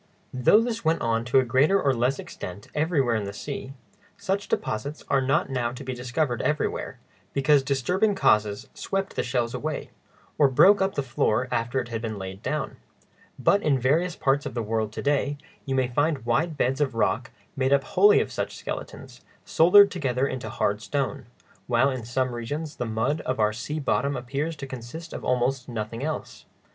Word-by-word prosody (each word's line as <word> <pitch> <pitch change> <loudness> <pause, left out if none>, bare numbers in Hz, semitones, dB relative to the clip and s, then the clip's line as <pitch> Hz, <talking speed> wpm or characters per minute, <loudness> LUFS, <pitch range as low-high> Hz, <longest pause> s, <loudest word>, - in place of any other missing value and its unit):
Though 130 - +5
this 230 -1 -3
went 160 +1 +1
on 115 0 0
to 120 +2 +2
a 130 - +5
greater 140 +11 +3
or 140 -7 +2
less 125 +3 +1
extent 90 +3 -8
everywhere 150 -6 +1
in 110 -2 -1
the 100 - -4
sea, 135 +4 -6 0.4
such 200 0 -2
deposits 140 +8 -3
are 135 - +3
not 140 +3 +1
now 120 -2 -1
to 130 - -8
be 130 -1 -4
discovered 125 +1 -1
everywhere, 150 +3 -1 0.4
because 140 +1 +4
disturbing 165 - +1
causes 105 - +2
swept 195 0 -3
the - - +1
shells 120 -1 -1
away, 155 -1 -4 0.5
or 145 - +7
broke 195 +10 +6
up 190 0 0
the 140 - 0
floor 120 -1 0
after 120 +3 0
it 120 -2 -5
had 115 -1 -3
been 110 -2 -4
laid 95 0 -7
down; 150 +3 -3 0.6
but 200 +10 +3
in 145 -3 +2
various 160 +8 +1
parts 140 +1 +1
of - - -8
the 120 - -1
world 110 0 -1
to - - -5
day, 145 0 +1 0.3
you 135 - 0
may 130 -1 +2
find 145 +1 0
wide 155 +7 0
beds 135 +2 0
of 135 -5 0
rock 115 +2 0 0.3
made 130 0 0
up 140 -1 +4
wholly 415 - +5
of - - -2
such - - -4
skeletons, - - -7 0.2
soldered 200 +5 +6
together 135 -6 0
into 125 -5 -4
hard 105 -2 -1
stone; 135 -2 -3 0.4
while 125 +3 +3
in 130 -3 -4
some 125 +1 -1
regions 145 +7 -5
the 120 - -2
mud 115 +8 -1
of 130 -2 -3
our 105 0 +3
sea 150 +7 -4
bottom 140 0 0
appears 140 +6 -3
to 140 -1 -7
consist 130 +6 -8
of - - -6
almost 125 +1 0
nothing 115 +1 -4
else. 155 +1 -5
135 Hz, 190 wpm, -25 LUFS, 120-150 Hz, 0.6 s, or